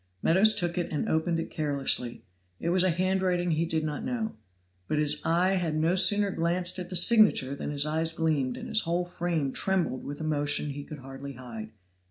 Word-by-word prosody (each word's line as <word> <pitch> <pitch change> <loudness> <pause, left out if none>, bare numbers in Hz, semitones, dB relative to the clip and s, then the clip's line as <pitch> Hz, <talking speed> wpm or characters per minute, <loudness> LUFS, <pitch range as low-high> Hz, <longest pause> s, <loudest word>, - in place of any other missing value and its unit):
Meadows 200 +6 +5
took 175 0 -1
it 175 - -3
and 150 - -2
opened 165 +1 0
it 165 - -5
carelessly; 140 -6 -1 0.4
it 170 - -2
was 180 +1 +3
a 185 - +3
handwriting 180 0 0
he 160 +1 0
did 160 -1 -1
not 150 -1 -4
know. 235 -4 -3 0.5
But 150 - -1
his 150 0 +1
eye 175 +3 +2
had 175 -5 -1
no 160 +3 +1
sooner 205 +2 +4
glanced 175 +2 -1
at 180 -1 -6
the 185 - -6
signature 180 - +5
than 140 - -5
his 145 0 +1
eyes 160 +1 +1
gleamed 155 -6 -1
and - - -7
his 220 - +1
whole 175 +1 -1
frame 170 -5 -2
trembled 185 -9 -1
with 145 +1 -7
emotion 145 -1 0
he 145 +1 -7
could 155 - -9
hardly 135 +1 -9
hide. 115 -4 -9
165 Hz, 200 wpm, -27 LUFS, 145-180 Hz, 0.5 s, Meadows